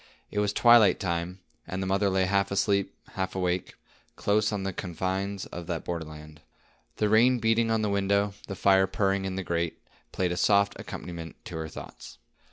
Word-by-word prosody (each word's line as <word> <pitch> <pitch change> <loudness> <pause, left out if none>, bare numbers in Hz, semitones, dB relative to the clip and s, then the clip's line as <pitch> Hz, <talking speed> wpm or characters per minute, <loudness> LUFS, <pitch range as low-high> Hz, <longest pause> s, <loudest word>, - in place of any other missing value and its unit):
It 105 - -1
was 105 -1 +1
twilight 115 -4 +6
time, 90 +1 -3 0.3
and 95 - -4
the 95 - -2
mother 100 +1 +1
lay 95 0 +2
half 100 +1 +1
asleep, 100 0 0
half 95 -1 -4
awake, 90 -1 -1 0.4
close 105 +1 +1
on 100 -2 -2
the 95 0 -3
confines 95 +2 -3
of 85 -1 -8
that 85 -2 -3
border 85 -2 -3
land. 75 0 -12 0.5
The 105 - +1
rain 120 +4 +5
beating 115 0 +2
on 110 -1 +1
the - - +1
window, 100 +1 +1
the 100 - -5
fire 95 0 +4
purring 95 -1 0
in 95 -1 -3
the 95 - -3
grate, 85 -1 -2 0.3
played 90 -2 -1
a 90 - -2
soft 100 +1 +3
accompaniment 85 -3 -7
to - - -6
her 80 0 -4
thoughts. 70 - -10
95 Hz, 185 wpm, -27 LUFS, 90-100 Hz, 0.5 s, twilight